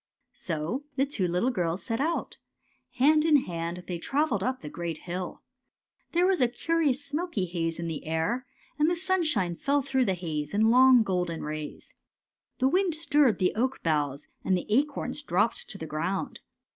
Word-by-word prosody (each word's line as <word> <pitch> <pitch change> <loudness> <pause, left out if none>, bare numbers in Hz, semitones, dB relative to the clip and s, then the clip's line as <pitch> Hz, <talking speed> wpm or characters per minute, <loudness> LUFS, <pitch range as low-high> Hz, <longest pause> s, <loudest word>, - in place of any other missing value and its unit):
" - - -56
So 170 - -2
the 270 0 +2
two 215 -10 -1
little 180 +9 +1
girls 175 -4 -1
set 225 +2 -2
out. 330 +3 -2 0.6
Hand 305 +4 +5
in 315 -1 +4
hand 170 +1 -4
they 175 -2 -4
travelled 275 - 0
up 255 +5 -1
the 150 - -7
great 165 +1 -4
hill. 180 +2 -6 0.7
There 350 +1 +4
was 370 -6 +2
a 250 - +5
curious 285 +2 0
smoky 290 - -2
haze 165 -2 -2
in 170 - -4
the 160 -2 -4
air, 205 +11 -1 0.3
and 305 +2 +4
the 350 - +1
sun 375 +1 +1
shine 185 - +1
fell 280 +8 +1
through 265 -1 +1
the 190 - +1
haze 155 -2 -4
in 220 +2 +4
long 255 -1 +7
golden 180 -4 -2
rays. 150 0 -6 0.6
The 260 - +3
wind 360 +2 +2
stirred 295 -6 +3
the 185 - +1
oak 260 +4 -1
boughs, 145 -4 0 0.2
and 185 - +2
the 180 - -4
acorns 275 +3 0
dropped 215 -4 0
to 195 - -7
the 160 - -6
ground. 165 +5 -3
220 Hz, 185 wpm, -28 LUFS, 170-285 Hz, 0.7 s, long